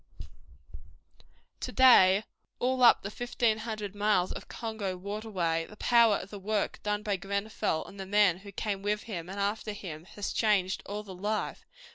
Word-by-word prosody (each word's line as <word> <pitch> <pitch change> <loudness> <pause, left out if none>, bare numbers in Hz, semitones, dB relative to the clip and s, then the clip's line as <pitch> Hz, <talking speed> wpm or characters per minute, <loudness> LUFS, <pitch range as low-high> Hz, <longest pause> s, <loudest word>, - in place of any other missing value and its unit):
To - - -4
day 210 -6 +6 0.3
all 255 +1 0
up 240 - +7
the 200 - -5
fifteen 235 -1 0
hundred 215 -3 -5
miles 205 -3 +1
of - - -7
Congo 215 -5 -4
waterway 185 -5 -2
the 210 - -12
power 235 -3 +5
of 195 - -6
the 205 - -7
work 210 +2 -1
done 210 0 -2
by 205 -2 0
Grenfell 200 -2 -2
and 195 - -12
the 190 - -6
men 200 -3 +4
who 200 +1 -11
came 200 0 -3
with 210 +1 -1
him 180 -6 -6
and 195 +1 -6
after 210 +2 -1
him 170 -6 -8
has 205 - -3
changed 195 -4 +1
all 205 +1 -4
the 195 -2 -9
life. 210 +4 -3
205 Hz, 170 wpm, -29 LUFS, 190-215 Hz, 0.3 s, up